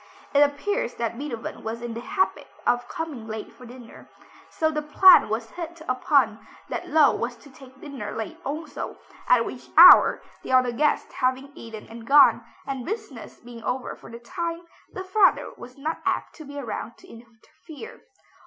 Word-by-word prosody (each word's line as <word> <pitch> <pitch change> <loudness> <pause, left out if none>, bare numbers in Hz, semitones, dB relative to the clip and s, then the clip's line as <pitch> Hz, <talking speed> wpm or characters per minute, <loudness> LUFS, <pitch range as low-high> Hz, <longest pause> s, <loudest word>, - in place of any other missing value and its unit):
It 285 - +4
appears 290 0 0
that 235 -1 -3
Beethoven 245 -3 -7
was 225 +1 -5
in 240 -1 -5
the 230 - -6
habit 375 +7 -1 0.2
of 245 0 +1
coming 295 -9 -6
late 220 -1 -7
for 250 - -14
dinner, 245 -1 -14 0.4
so 315 0 0
the 300 -1 -2
plan 300 - +6
was 225 +1 -4
hit 340 -1 -8
upon 255 -3 +2 0.3
that - - -4
Löwe 310 -2 +3
was 240 +1 -3
to 285 - -18
take 265 0 -16
dinner 270 -9 -7
late 225 - -6
also, 300 +3 -6 0.3
at 240 -2 +4
which 250 - -9
hour, 360 +2 +9 0.2
the - - -5
other 255 -1 +4
guests 295 +5 0
having 260 +2 -1
eaten 225 -4 -10
and 230 0 -11
gone, 285 +1 +6 0.2
and 270 -2 -5
business 430 - -7
being 235 -1 -12
over 250 0 -3
for - - -15
the 230 - -9
time, 335 +7 -5 0.3
the 370 - -6
father 380 +1 +2
was 250 +2 -13
not 310 +4 -4
apt - - -2
to 310 - -10
be 285 +1 -10
around 235 -2 -6
to - - -18
interfere. 240 - -14
260 Hz, 175 wpm, -24 LUFS, 235-310 Hz, 0.4 s, hour